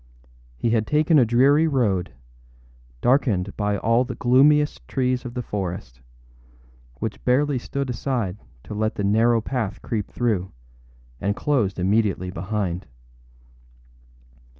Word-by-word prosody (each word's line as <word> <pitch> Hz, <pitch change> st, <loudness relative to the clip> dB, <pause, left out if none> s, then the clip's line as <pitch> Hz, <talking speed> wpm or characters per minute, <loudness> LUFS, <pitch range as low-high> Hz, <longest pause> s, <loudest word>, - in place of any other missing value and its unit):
He 115 Hz, -, 0 dB
had 110 Hz, -2 st, +1 dB
taken 150 Hz, +1 st, +4 dB
a 125 Hz, -, +5 dB
dreary 140 Hz, +7 st, +4 dB
road, 105 Hz, -, 0 dB, 0.9 s
darkened 110 Hz, -8 st, +1 dB
by 105 Hz, -1 st, 0 dB
all 115 Hz, +4 st, +2 dB
the -, -, -6 dB
gloomiest 145 Hz, +4 st, +3 dB
trees 125 Hz, -2 st, -1 dB
of 120 Hz, 0 st, -7 dB
the 125 Hz, -, -3 dB
forest, 90 Hz, -, -5 dB, 0.9 s
which -, -, -5 dB
barely 135 Hz, +2 st, +2 dB
stood 140 Hz, +2 st, -4 dB
aside 120 Hz, -6 st, -2 dB, 0.2 s
to -, -, -8 dB
let 110 Hz, +1 st, -1 dB
the 100 Hz, -, -3 dB
narrow 115 Hz, +3 st, +3 dB
path 110 Hz, -5 st, -3 dB
creep 105 Hz, -4 st, -3 dB
through, 105 Hz, -7 st, -1 dB, 0.7 s
and 100 Hz, 0 st, -1 dB
closed 120 Hz, -10 st, 0 dB
immediately 95 Hz, -1 st, +1 dB
behind. 95 Hz, 0 st, -3 dB
115 Hz, 125 wpm, -23 LUFS, 100-130 Hz, 0.9 s, a